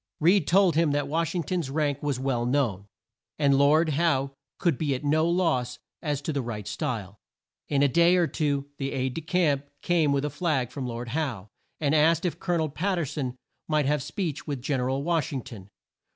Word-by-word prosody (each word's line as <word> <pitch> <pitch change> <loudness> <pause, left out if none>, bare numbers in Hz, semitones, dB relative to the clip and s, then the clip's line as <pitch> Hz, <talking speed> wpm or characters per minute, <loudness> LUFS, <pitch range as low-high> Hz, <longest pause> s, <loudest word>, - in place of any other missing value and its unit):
Reed 170 0 +4
told 185 -1 +4
him 160 -2 +3
that 145 0 0
Wash 165 +3 -1
ing 175 - 0
ton's 175 -4 -2
rank 145 -1 -1
was 145 -3 -1
well 130 -3 0
known, 120 -7 0 0.5
and 140 -2 +3
Lord 150 +4 +4
Howe 140 -3 +1 0.3
could 170 -3 +1
be 145 -4 0
at 130 - -6
no 155 +3 +2
loss 155 -9 +1 0.2
as 145 -3 -2
to 155 - -2
the 140 - 0
right 105 -4 -5
style. 105 -2 -4 0.5
In 140 -1 +2
a - - +6
day 170 +5 +4
or 175 -1 +4
two 145 -3 -1
an 135 - -2
aide 130 -1 -2
de 165 - -4
camp 155 -5 +1 0.2
came 165 -5 +2
with 140 0 +1
a 150 - -2
flag 145 -6 -1
from 130 -1 -4
Lord 120 0 -5
Howe, 125 -9 -3 0.3
and 145 -1 +1
asked 160 +2 +4
if 175 - -2
Col 175 -2 -1
o - - +2
nel 160 -1 0
Pat 185 +6 -1
ter 170 - 0
son 130 -3 -4 0.3
might 155 -2 +1
have 145 +1 +1
speech 155 +1 -4
with 140 -3 -3
Gen 135 +2 -1
er 125 - 0
al 135 +1 -1
Wash 165 -1 0
ing 135 -4 -3
ton. 105 -4 -11
145 Hz, 220 wpm, -27 LUFS, 130-165 Hz, 0.5 s, a